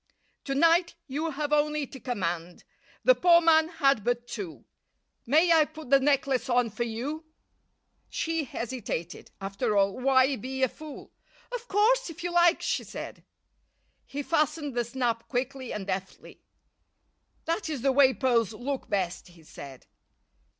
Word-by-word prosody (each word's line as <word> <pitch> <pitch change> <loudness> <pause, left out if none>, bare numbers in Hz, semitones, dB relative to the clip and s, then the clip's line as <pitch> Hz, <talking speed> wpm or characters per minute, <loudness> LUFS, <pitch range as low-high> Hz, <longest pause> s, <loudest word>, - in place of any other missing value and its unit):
"To 275 - -2
night 335 +3 +3
you 295 +4 -3
have 295 0 -3
only 300 0 +1
to 265 - -11
command. 175 -9 -4 0.4
The - - +7
poor 345 -6 +5
man 320 -1 +4
had 275 - +2
but 240 +1 -1
two. 175 - -7 0.6
May 320 +6 +5
I 320 -1 +6
put 310 -4 -12
the 275 - +7
necklace 270 -2 +1
on 245 -2 +2
for 235 +3 -2
you?" 270 +8 -5 0.8
She 325 -2 -2
hesitated. 230 -9 -5
After 195 +1 -1
all, 195 +3 +2
why 265 +1 +3
be 265 +4 -4
a 260 - +3
fool? 305 +2 -11 0.4
"Of 480 -1 -5
course, 450 +3 +2
if 330 - -9
you 350 - -2
like," 345 -1 +4
she - - -1
said. - - -8 0.8
He 285 +1 -5
fastened 300 -2 0
the 240 0 0
snap 235 -1 -2
quickly 260 0 -3
and 205 -2 -4
deftly. 190 -1 -6 1.0
"That 330 +2 -2
is 285 -6 -4
the 275 - +4
way 265 0 +6
pearls 235 -5 +1
look 260 +5 -4
best," 185 -3 -2
he 170 -2 -18
said. 140 -3 -11
265 Hz, 150 wpm, -28 LUFS, 230-310 Hz, 1.0 s, The